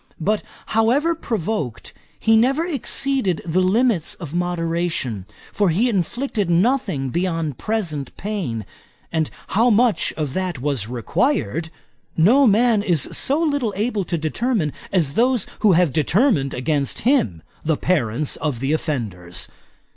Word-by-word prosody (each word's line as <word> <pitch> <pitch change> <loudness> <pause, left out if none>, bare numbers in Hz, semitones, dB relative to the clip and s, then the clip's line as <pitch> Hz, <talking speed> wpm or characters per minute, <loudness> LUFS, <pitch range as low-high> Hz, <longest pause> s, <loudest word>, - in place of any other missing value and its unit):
But, 210 +6 +1 0.3
however 250 +10 +3
provoked, 210 - -3 0.3
he 225 - +4
never 270 +8 +3
exceeded 270 - -1
the 175 +2 +1
limits 200 -2 +2
of 165 -5 -8
moderation, 165 - -2 0.3
for 205 -3 +2
he 210 +10 +2
inflicted 215 - -1
nothing 185 - +1
beyond 165 -3 -2
present 165 - -3
pain; 170 - -3 0.5
and 160 -2 0 0.2
how 230 +5 +3
much 230 0 +3
of 150 -4 -3
that 185 -5 -2
was 130 -6 -2
required, 160 - -1 0.5
no 245 - +5
man 220 0 +4
is 175 -8 +1
so 285 +4 +1
little 285 -9 0
able 215 -1 0
to 170 - -2
determine 160 - -1 0.2
as 165 -8 +2
those 245 - +2
who 210 -3 +5
have 170 -5 +3
determined 160 - +2
against 140 +2 -1
him; 115 - +1 0.2
the 160 -1 +1
parents 145 -5 0
of 145 -6 -2
the 135 +3 -1
offenders. 110 - -3
180 Hz, 130 wpm, -21 LUFS, 150-225 Hz, 0.5 s, no